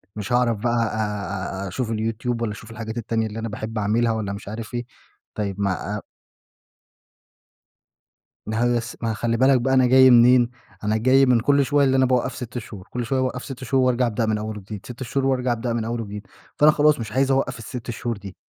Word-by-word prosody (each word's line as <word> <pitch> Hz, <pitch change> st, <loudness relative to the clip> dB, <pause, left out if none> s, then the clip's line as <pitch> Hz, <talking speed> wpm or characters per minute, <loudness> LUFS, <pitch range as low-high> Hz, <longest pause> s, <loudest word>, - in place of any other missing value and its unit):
مش 105 Hz, +3 st, -4 dB
هاعرف 120 Hz, -2 st, +2 dB
بقىى 120 Hz, +3 st, -1 dB
أ 105 Hz, -4 st, -2 dB
أ -, -, -4 dB
أ -, -, -4 dB
أشوف 115 Hz, +5 st, -3 dB
الYouTube، 115 Hz, +2 st, -2 dB
والّا 115 Hz, -2 st, -1 dB
أشوف 110 Hz, +2 st, -10 dB
الحاجات 115 Hz, 0 st, -6 dB
التانية 115 Hz, -1 st, -1 dB
اللي 110 Hz, +1 st, -6 dB
أنا 115 Hz, 0 st, -4 dB
باحب 110 Hz, +1 st, -5 dB
أعملها، 110 Hz, +3 st, +1 dB
والّا 110 Hz, -3 st, -2 dB
مش 100 Hz, -, -9 dB
عارف 110 Hz, +3 st, -7 dB
إيه. 120 Hz, 0 st, -3 dB, 0.5 s
طيّب 100 Hz, -2 st, -3 dB
ما 100 Hz, +1 st, -1 dB
آآ 105 Hz, -, -4 dB, 2.4 s
ما 110 Hz, +1 st, -2 dB
هو 120 Hz, 0 st, +2 dB
بس 120 Hz, -1 st, -5 dB
ما 115 Hz, -1 st, -1 dB
خلي 115 Hz, +1 st, -1 dB
بالك 130 Hz, 0 st, +4 dB
بقى 130 Hz, +2 st, +1 dB
أنا 130 Hz, -1 st, +5 dB
جاي 130 Hz, +1 st, +7 dB
منين؟ 120 Hz, 0 st, +6 dB, 0.3 s
أنا 105 Hz, +1 st, +1 dB
جاي 130 Hz, +4 st, +4 dB
من 125 Hz, -2 st, +4 dB
كل 140 Hz, +4 st, +3 dB
شوية 145 Hz, 0 st, +3 dB
اللي 135 Hz, 0 st, +3 dB
أنا 130 Hz, -, +4 dB
باوقف 130 Hz, 0 st, 0 dB
6 125 Hz, -1 st, -6 dB
شهور، 105 Hz, -4 st, -8 dB
كل 120 Hz, -1 st, -3 dB
شوية 130 Hz, +3 st, 0 dB
باوقف 125 Hz, -1 st, -2 dB
6 135 Hz, -2 st, -8 dB
شهور 130 Hz, +1 st, +2 dB
وأرجع 125 Hz, -1 st, +2 dB
أبدأ 115 Hz, 0 st, -1 dB
من 110 Hz, -1 st, 0 dB
أول 110 Hz, 0 st, -5 dB
وجديد، 105 Hz, +1 st, -9 dB
6 125 Hz, +1 st, -7 dB
شهور 135 Hz, +2 st, -1 dB
وأرجع 130 Hz, -2 st, +1 dB
أبدأ 120 Hz, 0 st, -2 dB
من 115 Hz, -1 st, -2 dB
أول 115 Hz, +1 st, -2 dB
وجديد. 105 Hz, -1 st, -7 dB, 0.3 s
فأنا 150 Hz, +1 st, +6 dB
خلاص 150 Hz, -2 st, +3 dB
مش 110 Hz, -2 st, -5 dB
عايز 135 Hz, +3 st, +2 dB
أوقف 135 Hz, -1 st, 0 dB
ال6 120 Hz, +2 st, -6 dB
شهور 115 Hz, -1 st, -4 dB
دي. 100 Hz, -2 st, -10 dB
115 Hz, 220 wpm, -23 LUFS, 110-125 Hz, 2.4 s, جاي